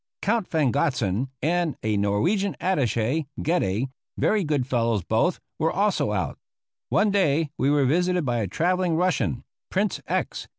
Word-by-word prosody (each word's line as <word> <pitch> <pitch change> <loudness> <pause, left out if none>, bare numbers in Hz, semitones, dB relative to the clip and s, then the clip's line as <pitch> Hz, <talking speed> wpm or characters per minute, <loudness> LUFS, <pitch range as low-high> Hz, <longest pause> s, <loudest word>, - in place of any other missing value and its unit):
Count 215 -1 +1
von 150 -6 +1
Gotzen, 125 -4 0
and 170 0 +1
a 110 -1 +1
Norwegian 165 - +1
attache, 135 - 0
Gedde, 130 - 0 0.3
very 210 -2 +2
good 145 -5 0
fellows 115 -6 0
both, 115 - +1 0.2
were 160 0 +2
also 195 - +1
out. 95 -9 -2 0.5
One 210 0 +3
day 165 -6 +2
we 140 - +1
were 145 -1 +3
visited 180 +4 +1
by 120 -2 0
a 105 - -1
travelling 175 - +1
Russian, 165 - 0 0.3
Prince - - 0
X. - - -2
150 Hz, 145 wpm, -25 LUFS, 115-180 Hz, 0.5 s, One